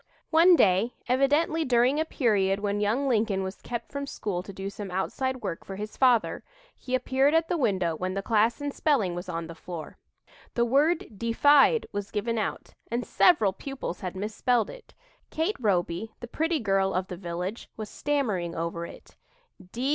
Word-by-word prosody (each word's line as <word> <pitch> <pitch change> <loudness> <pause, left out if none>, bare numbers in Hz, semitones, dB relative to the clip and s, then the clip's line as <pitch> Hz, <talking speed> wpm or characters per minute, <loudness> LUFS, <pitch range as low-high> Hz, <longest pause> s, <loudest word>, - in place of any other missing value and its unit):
One 340 +3 +7
day, 205 - +3
evidently 290 +6 +2
during 255 +2 +3
a 315 - +1
period 200 -9 +1
when 205 0 -1
young 225 +7 +1
Lincoln 215 -5 +1
was 190 +1 -6
kept 235 -1 -5
from 280 -1 -4
school 190 -8 -3
to 195 - -9
do 195 0 -6
some 200 0 -6
outside 260 +8 -2
work 165 - -4
for 195 - -7
his 210 +2 -6
father, 250 -4 +3 0.3
he 255 - -3
appeared 265 +3 +2
at 325 0 +2
the 355 - +1
window 190 - +1
when 185 +3 -3
the 195 - -2
class 225 +1 +2
in 285 0 -2
spelling 260 - +1
was 175 +2 -6
on 165 -1 -3
the 165 - -8
floor. 165 -1 -8 0.6
The 235 - +3
word 280 - +1
"defied" 285 - +4
was 205 0 -4
given 225 +2 -1
out 210 - -4 0.2
and 235 +1 -2
several 220 - +4
pupils 270 -4 -6
had 185 0 -5
misspelled 220 +4 0
it. - - -14 0.3
Kate 325 +7 -1
Roby, 200 -1 -1
the 240 - -7
pretty 320 +6 0
girl 195 -4 +1
of 185 0 0
the 180 - -6
village, 180 +4 -5
was 215 -1 -5
stammering 210 -13 -1
over 170 +1 -3
it. - - -14
220 Hz, 175 wpm, -27 LUFS, 190-270 Hz, 0.6 s, One